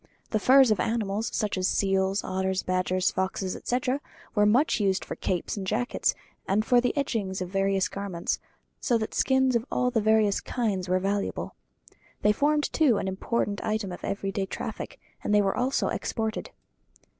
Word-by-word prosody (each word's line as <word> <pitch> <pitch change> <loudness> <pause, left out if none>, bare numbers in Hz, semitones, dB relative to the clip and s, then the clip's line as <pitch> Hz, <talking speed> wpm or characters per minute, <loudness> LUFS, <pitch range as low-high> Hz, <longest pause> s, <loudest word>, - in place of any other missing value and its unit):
The 215 - +2
furs 260 +1 +6
of 215 - +2
animals, 220 -1 -1
such 210 -4 -1
as 185 - +2
seals, 195 0 +1
otters, 190 0 -1
badgers, 185 0 +1
foxes, 190 0 -2
etc., 255 +3 -1 0.3
were 210 -2 +4
much 245 +5 +3
used 195 -2 +1
for - - -5
capes 180 -2 -2
and 190 -2 -4
jackets, 235 +5 0 0.3
and 210 +3 +1
for 245 0 +4
the 250 +4 -1
edgings 210 -9 -1
of 180 -1 -4
various 195 0 +1
garments, 195 -4 -3 0.4
so 240 - +2
that 220 -1 -4
skins 265 -1 +3
of 230 - +2
all 250 0 +1
the 225 -3 +1
various 215 -1 +3
kinds 200 -7 -2
were 185 - +3
valuable. 200 +2 -2 0.7
They 210 - +5
formed, 295 +6 +1
too, 280 -9 +4
an - - -2
important 200 +2 -1
item 215 -3 -1
of 175 - -8
everyday 195 0 -2
traffic, - - -6 0.2
and 210 - +2
they 205 - +6
were 195 - 0
also 255 +2 +1
exported. 220 -1 -3
205 Hz, 170 wpm, -27 LUFS, 190-235 Hz, 0.7 s, furs